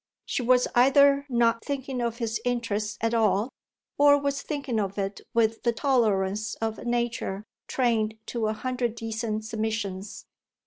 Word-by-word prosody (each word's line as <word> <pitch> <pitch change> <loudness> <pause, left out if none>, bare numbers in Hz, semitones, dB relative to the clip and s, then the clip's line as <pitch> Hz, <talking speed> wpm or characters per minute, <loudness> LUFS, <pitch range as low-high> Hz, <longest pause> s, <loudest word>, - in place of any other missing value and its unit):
She - - -2
was 250 +1 +4
either 280 +3 +5
not 235 -2 +2
thinking 265 -2 -3
of 235 -1 -2
his 230 -2 -2
interest 230 -4 -1
at 225 +1 +1
all, 215 0 +2 0.5
or 285 0 +7
was 280 0 -1
thinking 280 -6 -2
of 200 -1 -2
it 195 0 -3
with 225 -1 +2
the 235 - +2
tolerance 215 -5 +1
of 225 -1 -3
a - - -9
nature 235 -4 -2 0.2
trained 220 -4 +1
to 230 -3 -2
a 215 - 0
hundred 245 0 -2
decent 225 -1 -3
submissions. 215 -3 -4
230 Hz, 150 wpm, -26 LUFS, 215-250 Hz, 0.5 s, or